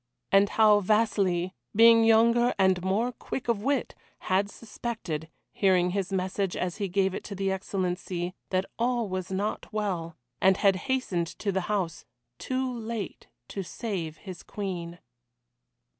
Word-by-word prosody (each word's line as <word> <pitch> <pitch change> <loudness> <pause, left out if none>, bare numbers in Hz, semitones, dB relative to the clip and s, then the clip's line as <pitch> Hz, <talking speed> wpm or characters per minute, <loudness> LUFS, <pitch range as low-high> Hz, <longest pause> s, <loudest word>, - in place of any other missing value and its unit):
And 195 +1 +5
How 215 -2 +5
Vasili, 190 -4 +1 0.2
being 230 +1 +7
younger 235 +2 +4
and 190 -2 +3
more 210 +6 +1
quick 245 +1 -6
of 230 -4 +1
wit, 275 +2 0 0.3
had 195 +2 +1
suspected, 210 -9 -5 0.2
hearing 180 -2 +3
his 195 0 -2
message 190 0 -1
as 180 -1 -2
he 200 -2 -1
gave 190 0 +1
it - - -5
to 200 - -6
the 195 0 0
Excellency, 185 -2 -2 0.2
that 185 0 +1
all 240 -1 +1
was 185 -1 -4
not 200 +3 -2
well, 185 -7 -2 0.2
and 190 0 +5
had 195 -2 +4
hastened 225 -11 0
to 200 - -1
the 190 0 0
house 185 -6 -1 0.4
too 260 -1 -2
late 225 -3 -5 0.2
to 195 - -4
save 180 -5 -4
his 185 -4 -9
Queen. 175 -4 -5
195 Hz, 145 wpm, -28 LUFS, 185-220 Hz, 0.4 s, being